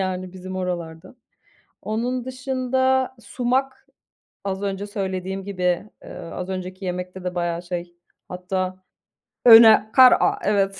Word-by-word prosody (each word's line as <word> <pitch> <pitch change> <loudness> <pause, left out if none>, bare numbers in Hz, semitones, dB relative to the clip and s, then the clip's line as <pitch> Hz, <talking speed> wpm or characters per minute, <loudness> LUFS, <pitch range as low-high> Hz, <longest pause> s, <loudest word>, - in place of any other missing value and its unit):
yani, 185 -1 -3
bizim 185 0 -8
oralarda. 175 +1 -5 0.7
Onun 240 +3 -3
dışında, 260 0 -1
sumak, 260 +3 -2 0.6
az 195 0 -3
önce 200 0 -3
söylediğim 190 -1 -4
gibi, 180 0 -1
eee, - - -11
az 180 +2 -7
önceki 185 +1 -6
yemekte 180 +1 -5
de 180 0 -4
bayağı 175 -1 -2
şey, 175 -1 -6 0.3
hatta 185 0 -4 0.6
öne 225 -2 +8
kar 255 -1 +8
a - - +1
evet 195 -1 +1
190 Hz, 120 wpm, -22 LUFS, 180-235 Hz, 0.7 s, öne